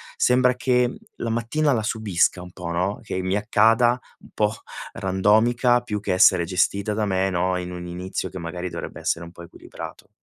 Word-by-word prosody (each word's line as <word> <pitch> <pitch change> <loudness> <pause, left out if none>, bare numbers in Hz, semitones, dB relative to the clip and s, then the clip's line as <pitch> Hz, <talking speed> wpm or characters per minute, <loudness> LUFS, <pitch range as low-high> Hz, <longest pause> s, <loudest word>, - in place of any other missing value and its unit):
Sembra 125 0 +3
che, 125 -1 +2
mhmm, - - -7 0.2
la 115 - -3
mattina 120 +6 +1
la 110 -3 0
subisca 100 -5 +1
un 90 0 -10
po', 90 -2 -6
no? 90 +4 -1
Che 95 -3 -3
mi 95 +1 -1
accada 115 +3 +3 0.2
un - - -17
po' 105 0 +1 0.4
randomica 110 +6 +3
più 105 -4 -4
che 100 -2 -2
essere 90 -1 +5
gestita 100 +4 0
da 105 0 0
me, 95 -1 +1
no, 90 0 0
in 90 0 -5
un 90 0 -7
inizio 90 +2 -4
che 95 - -8
magari 90 +2 -5
dovrebbe - - -7
essere 85 0 -1
un 85 - -11
po' 85 - -11
equilibrato. 85 - -10
100 Hz, 195 wpm, -23 LUFS, 90-115 Hz, 0.4 s, essere